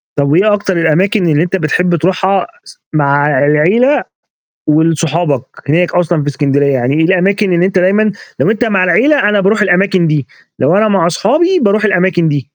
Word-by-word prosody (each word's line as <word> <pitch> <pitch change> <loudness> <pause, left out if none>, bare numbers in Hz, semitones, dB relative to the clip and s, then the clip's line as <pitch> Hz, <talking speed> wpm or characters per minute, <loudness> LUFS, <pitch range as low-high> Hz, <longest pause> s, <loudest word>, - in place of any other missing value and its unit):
طَب 140 -1 0
وإيه 200 +7 +2
أكتر 200 -3 -2
الأماكن 175 +4 +1
اللي 155 0 +1
أنت 180 +2 -2
بتحب 180 +1 0
تروحها 190 +3 -1 0.2
س - - -17 0.2
مع 145 -1 +1 0.2
العيلة 190 - +2 0.6
ولصحابك 160 -2 0 0.3
هناك 170 +4 0
أصلًا 175 -3 0
في 145 - -4
إسكندرية؟ 140 0 0
يعني 130 +1 -1
إيه 160 +1 +1
الأماكن 190 +3 +1
اللي 175 +1 +2
أنت 190 -1 -1
دايمًا 200 +4 +1 0.3
لو - - +2
أنت 225 +2 -1
مع 200 -5 0
العيلة 235 - +2
أنا 210 -1 +1
باروح 210 +3 +1
الأماكن 190 -2 +1
دي، 150 -4 -1 0.3
لو 175 - +1
أنا 215 +2 +2
مع 195 -5 +1
أصحابي 300 - +1
باروح 210 +1 +1
الأماكن 185 -4 +1
دي؟ 145 -3 -3
180 Hz, 175 wpm, -12 LUFS, 155-200 Hz, 0.6 s, وإيه